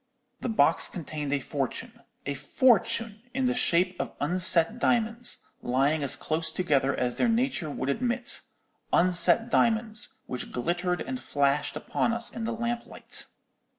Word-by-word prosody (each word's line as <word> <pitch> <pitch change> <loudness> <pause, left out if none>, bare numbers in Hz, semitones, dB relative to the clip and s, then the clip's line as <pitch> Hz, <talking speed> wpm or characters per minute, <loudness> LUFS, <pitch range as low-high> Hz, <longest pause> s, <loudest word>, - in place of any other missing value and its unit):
"The - - -3
box 220 - +4
contained 150 -4 -5
a 145 - +1
fortune—a 140 +1 -6
fortune 225 - +1
in 265 -1 0
the 250 - +2
shape 180 -6 +1
of - - -4
unset 175 +6 +5
diamonds, 235 0 0 0.2
lying 135 +5 +1
as 140 - -1
close 160 +1 -1
together 140 -6 +1
as 125 -1 -1
their 240 - +2
nature 230 - 0
would 130 -2 -4
admit—unset 230 - 0
diamonds, 220 -1 +1
which 125 - -6
glittered 175 +7 -1
and 255 - -4
flashed 140 - 0
upon 235 - -1
us 235 0 -1
in 230 -1 -4
the 230 - -2
lamplight. 235 +1 -4
185 Hz, 135 wpm, -27 LUFS, 145-235 Hz, 0.2 s, unset